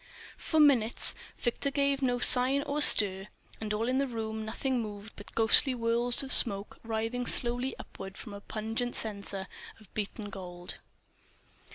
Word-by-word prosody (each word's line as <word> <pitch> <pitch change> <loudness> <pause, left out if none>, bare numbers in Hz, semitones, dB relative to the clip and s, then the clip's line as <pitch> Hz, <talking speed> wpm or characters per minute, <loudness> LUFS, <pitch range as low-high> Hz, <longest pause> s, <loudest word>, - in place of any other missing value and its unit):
For 315 - -2
minutes 255 -7 +2 0.2
Victor 240 +4 -3
gave 280 0 -1
no 250 -2 -1
sign 255 +3 +5
or 290 +1 -4
stir; 195 -7 +5 0.3
and 215 -1 -6
in 210 - -2
all 225 - -2
the 260 +3 -1
room 220 -2 -6
nothing 245 +3 -4
moved 210 0 -10
but 205 - -15
ghostly 230 +4 +6
whorls 235 +2 +1
of 270 - 0
smoke 200 -3 +3
writhing 225 +2 -4
slowly 245 +1 0
upward 195 0 -11
from 215 - -11
a 200 - -10
pungent 225 +3 -5
censer 200 -3 -5 0.3
of 215 -4 -22
beaten 205 0 -7
gold. 180 -2 -9
225 Hz, 155 wpm, -28 LUFS, 210-255 Hz, 0.3 s, ghostly